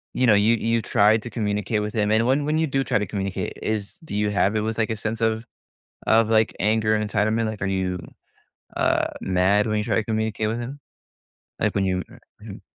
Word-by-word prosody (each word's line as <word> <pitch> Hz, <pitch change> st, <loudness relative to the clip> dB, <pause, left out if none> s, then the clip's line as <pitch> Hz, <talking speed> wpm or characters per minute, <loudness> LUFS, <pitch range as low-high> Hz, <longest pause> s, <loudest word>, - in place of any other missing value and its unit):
you 125 Hz, -1 st, +2 dB
know, 105 Hz, -, +6 dB
you 110 Hz, +3 st, +4 dB
you 115 Hz, +1 st, 0 dB
tried 105 Hz, +2 st, +3 dB
to 120 Hz, -, -6 dB
communicate 105 Hz, -1 st, -1 dB
with 105 Hz, 0 st, -4 dB
him, 105 Hz, -1 st, +1 dB
and 115 Hz, +2 st, +3 dB
when 140 Hz, +2 st, +2 dB
when 155 Hz, +1 st, +1 dB
you 160 Hz, -, +1 dB
do 135 Hz, 0 st, 0 dB
try -, -, +1 dB
to 105 Hz, -, -1 dB
communicate, 100 Hz, -2 st, -3 dB
is 110 Hz, -, -3 dB
do 100 Hz, -, -6 dB
you 105 Hz, 0 st, +1 dB
have 100 Hz, +1 st, +1 dB
it 105 Hz, -, +1 dB
with, 110 Hz, +1 st, -2 dB
like, 110 Hz, 0 st, 0 dB
a -, -, -1 dB
sense 110 Hz, +2 st, -4 dB
of 110 Hz, 0 st, +1 dB, 0.6 s
of, 110 Hz, 0 st, +4 dB
like, 110 Hz, 0 st, +2 dB
anger 110 Hz, +1 st, +2 dB
and 105 Hz, 0 st, -2 dB
entitlement, 110 Hz, +2 st, +1 dB
like, 110 Hz, -1 st, -5 dB
are -, -, 0 dB
you, 90 Hz, -1 st, -1 dB, 0.8 s
uh, -, -, +2 dB
mad 95 Hz, +3 st, +2 dB
when 110 Hz, 0 st, 0 dB
you -, -, -1 dB
try -, -, 0 dB
to 110 Hz, -, +1 dB
communicate 110 Hz, 0 st, -1 dB
with 115 Hz, +2 st, -2 dB
him? 135 Hz, +4 st, -6 dB, 0.8 s
Like, -, -, +1 dB
when 100 Hz, -1 st, +1 dB
you, 90 Hz, -1 st, 0 dB, 0.4 s
u -, -, -13 dB
Mhm. -, -, -12 dB
110 Hz, 230 wpm, -23 LUFS, 105-115 Hz, 0.8 s, know